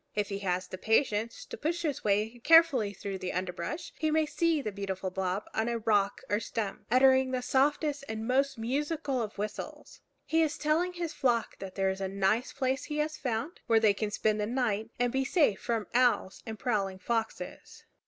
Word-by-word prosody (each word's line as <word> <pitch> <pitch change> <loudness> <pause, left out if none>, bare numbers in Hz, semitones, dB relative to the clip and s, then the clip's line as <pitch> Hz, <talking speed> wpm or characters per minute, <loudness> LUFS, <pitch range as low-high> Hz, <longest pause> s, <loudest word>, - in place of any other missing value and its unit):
If 210 0 0
he 200 -1 -3
has 185 -2 -1
the 185 0 -8
patience 220 0 +1
to - - -7
push 340 +3 -2
his 295 -4 -2
way 215 +3 +1
carefully 290 -7 +5
through 195 0 -6
the 185 - -3
underbrush, 185 - -4
he 315 - +1
may 310 0 +3
see 320 +1 +1
the 220 -7 -3
beautiful 195 -1 -4
Bob 190 +1 -2
on 220 +2 0
a 235 - 0
rock 210 -3 +1
or 205 - +1
stump, 220 -3 -4
uttering 260 +2 +5
the 255 -1 -2
softest 290 +2 +1
and 220 0 -4
most 270 +1 +2
musical 275 +3 -1
of 215 -2 -5
whistles. 210 +1 -6 0.2
He 325 +1 +2
is 315 -1 +1
telling 320 +4 +1
his 340 -2 -4
flock 245 -6 0
that 190 0 -8
here 195 0 +2
is 190 +1 -3
a 190 - 0
nice 195 +5 +1
place 265 +1 -1
he 300 - -4
has 305 +1 0
found, 260 +6 -3
where 225 -1 +5
they 215 -2 +4
can 210 +1 -2
spend 215 0 0
the 210 - -1
night 225 -3 -1
and 245 -1 +2
be 265 0 +1
safe 275 - +2
from 230 -3 -1
owls 245 -6 +2
and 220 -1 -5
prowling 200 -5 -1
foxes. 225 +3 -4
230 Hz, 200 wpm, -30 LUFS, 205-280 Hz, 0.2 s, carefully